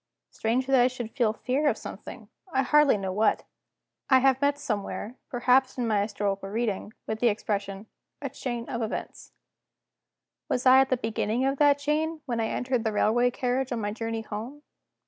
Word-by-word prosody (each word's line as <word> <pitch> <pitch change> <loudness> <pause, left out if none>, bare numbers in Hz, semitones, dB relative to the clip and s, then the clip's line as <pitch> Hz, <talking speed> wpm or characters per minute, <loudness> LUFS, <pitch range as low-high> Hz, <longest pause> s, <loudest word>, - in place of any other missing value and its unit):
Strange 235 +4 0
that 270 -1 +3
I 245 - +5
should 245 -3 -5
feel 235 -5 +1
fear 260 +7 -1
of - - -1
something - - -9 0.2
I 265 -3 +2
hardly 295 -2 +4
know 190 -2 -3
what! 215 +3 +2 0.7
I 260 - +7
have 265 0 +3
met 285 0 +2
somewhere 215 -3 -4
(perhaps 255 +2 +2
in 245 - -1
my 210 -2 +2
historical 200 -1 -2
reading) 215 -1 -2
with 220 0 -3
the 245 - +3
expression: 200 -2 -2 0.3
"A 285 - -4
chain 240 -3 -4
of 235 -2 -3
events." 220 0 -5 1.2
Was 250 - -1
I 260 +1 +8
at 270 - +1
the 255 - +2
beginning 225 +1 -1
of 275 0 0
that 290 -1 +5
chain, 305 +2 -1
when 240 -4 -2
I 225 - 0
entered 250 -1 -1
the 220 - 0
railway 235 +4 +3
carriage 255 +2 -1
on 240 - -1
my 205 -1 -2
journey 225 +1 -3
home? 230 +8 -7
245 Hz, 185 wpm, -27 LUFS, 220-265 Hz, 1.2 s, I